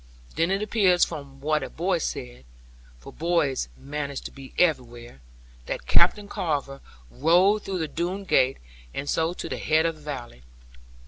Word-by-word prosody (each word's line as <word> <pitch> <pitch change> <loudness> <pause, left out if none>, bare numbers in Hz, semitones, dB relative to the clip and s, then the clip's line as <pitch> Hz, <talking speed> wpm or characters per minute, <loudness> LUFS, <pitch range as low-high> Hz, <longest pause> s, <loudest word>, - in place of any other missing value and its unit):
Then 165 +2 +2
it 195 +2 +1
appears 195 -5 +4
from 140 -2 -8
what 150 +1 +1
a - - -4
boy 175 +1 0
said 60 - -5 0.5
for - - -12
boys 155 - 0
manage 140 -1 -4
to - - -7
be 135 -1 -11
everywhere 120 - 0 0.5
that - - -4
Captain 200 - +4
Carver 140 -7 -2 0.3
rode 180 +8 +4
through 190 -1 -2
the 160 -3 -1
Doone 180 +5 -3
gate, 135 -8 +3 0.4
and 140 - -3
so 160 +3 +1
to - - -5
the - - -4
head 160 +1 +3
of 165 - +1
the - - -17
valley. 130 - -7
155 Hz, 165 wpm, -26 LUFS, 135-175 Hz, 0.5 s, appears